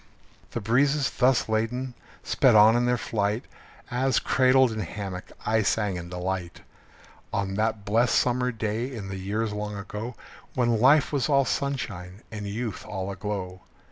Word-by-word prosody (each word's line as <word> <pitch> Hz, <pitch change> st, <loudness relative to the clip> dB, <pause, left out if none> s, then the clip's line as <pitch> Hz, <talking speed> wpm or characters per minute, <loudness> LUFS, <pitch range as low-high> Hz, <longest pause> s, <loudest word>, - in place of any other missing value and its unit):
The -, -, -4 dB
breezes, 135 Hz, +6 st, +2 dB
thus 130 Hz, -1 st, +2 dB
ladened, 120 Hz, +4 st, -1 dB, 0.3 s
sped -, -, +3 dB
on 110 Hz, +2 st, +7 dB
in 120 Hz, 0 st, +2 dB
their 125 Hz, 0 st, +2 dB
flight, 105 Hz, 0 st, -1 dB, 0.5 s
As, 130 Hz, +2 st, +1 dB
cradled 130 Hz, -1 st, +4 dB
in 110 Hz, -, -4 dB
hammock, 95 Hz, -1 st, -5 dB, 0.2 s
I 110 Hz, 0 st, +2 dB
sang 105 Hz, -1 st, 0 dB
in 85 Hz, -1 st, -6 dB
delight, 90 Hz, -1 st, -4 dB, 0.7 s
On 95 Hz, -1 st, -1 dB
that 110 Hz, 0 st, -1 dB
blest 115 Hz, +4 st, +2 dB
summer 125 Hz, 0 st, +2 dB
day 110 Hz, +3 st, -2 dB
in 105 Hz, -6 st, -6 dB
the 95 Hz, 0 st, -5 dB
years 105 Hz, +3 st, -2 dB
long 105 Hz, 0 st, -4 dB
ago, 105 Hz, +4 st, -6 dB, 0.4 s
When 120 Hz, -3 st, +2 dB
life 145 Hz, +4 st, +5 dB
was 140 Hz, 0 st, +1 dB
all 140 Hz, -2 st, +4 dB
sunshine 100 Hz, -11 st, -3 dB
and 105 Hz, -2 st, -5 dB
youth 110 Hz, +2 st, -4 dB
all 95 Hz, 0 st, -4 dB
aglow. 95 Hz, -2 st, -5 dB
110 Hz, 155 wpm, -26 LUFS, 100-125 Hz, 0.7 s, on